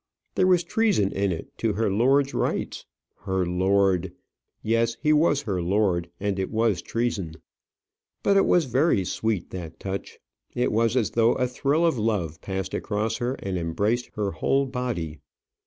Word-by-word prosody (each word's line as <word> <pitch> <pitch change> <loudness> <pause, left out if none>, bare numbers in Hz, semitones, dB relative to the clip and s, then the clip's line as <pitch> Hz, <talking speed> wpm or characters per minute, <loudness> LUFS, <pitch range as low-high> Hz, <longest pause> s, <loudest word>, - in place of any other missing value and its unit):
There 185 - +3
was 180 -2 +4
treason 200 - +1
in 100 -1 0
it 80 - -6
to 115 -2 +1
her 105 0 0
lord's 135 +7 +3
rights. - - -2 0.3
Her 95 -1 -1
lord! 95 0 +2 0.5
Yes, 115 +1 +1
he 155 0 +3
was 150 -2 +3
her 95 -7 -2
lord, 90 -2 +1
and 100 -1 -1
it 95 - -1
was 110 -5 +1
treason. 105 -9 -2 0.9
But 200 - +3
it 195 - +4
was 175 -3 +4
very 130 - +2
sweet 105 -2 -2
that 85 -3 -7
touch; 95 0 -5 0.4
it 125 - +1
was 115 +2 +2
as 115 - +1
though 115 0 +3
a 125 - 0
thrill 140 +6 +1
of 160 -8 +1
love 100 -8 -1
passed 95 -1 -4
across 110 +1 -1
her 125 +2 -2
and 95 -6 -3
embraced 105 +9 -1
her 105 -2 -1
whole 135 +12 +1
body. 120 - -4
110 Hz, 165 wpm, -25 LUFS, 95-125 Hz, 0.9 s, was